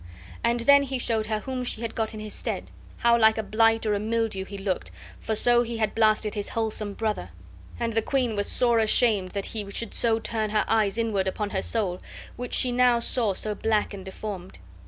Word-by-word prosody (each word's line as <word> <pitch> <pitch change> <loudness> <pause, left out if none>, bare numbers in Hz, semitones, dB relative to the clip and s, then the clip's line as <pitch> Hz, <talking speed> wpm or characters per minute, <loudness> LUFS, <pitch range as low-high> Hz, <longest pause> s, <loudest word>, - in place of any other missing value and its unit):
And 235 0 +1
then 280 +3 +5
be 265 0 -2
showed 225 -3 0
her 215 -1 -1
whom 260 0 -4
she 240 -2 -3
had 230 - -3
got 220 -1 -2
in - - -7
his 215 -1 -7
stead; - - -4 0.3
how 235 0 +4
like 220 0 +5
a 220 - -1
blight 225 +1 +2
or 210 - +1
a 205 - 0
mildew 220 -3 -1
he 200 +1 -8
looked, 195 -1 -3 0.3
for 220 - -2
so 240 +2 +5
he 235 -1 -3
had 215 -2 0
blasted 215 -1 +2
his 205 -2 -3
wholesome 215 -2 -3
brother. 215 - -2 0.5
And 230 -1 -1
the 225 - +2
queen 250 -2 0
was 205 0 -1
sore 235 -2 +3
ashamed 215 -4 +2
that 200 -1 -2
he 210 -3 -4
should 220 +2 -2
so 225 -1 +2
turn 220 -1 -2
her 210 0 +1
eyes 220 -2 +2
inward 215 -5 0
upon 205 +2 -2
her 190 - 0
soul, 190 -6 -1 0.3
which 245 0 -4
she 255 - +3
now 245 -1 +4
saw 235 -3 +1
so 215 +2 -3
black 215 0 0
and 195 -1 -7
deformed. 190 -1 -7
220 Hz, 220 wpm, -26 LUFS, 205-235 Hz, 0.5 s, then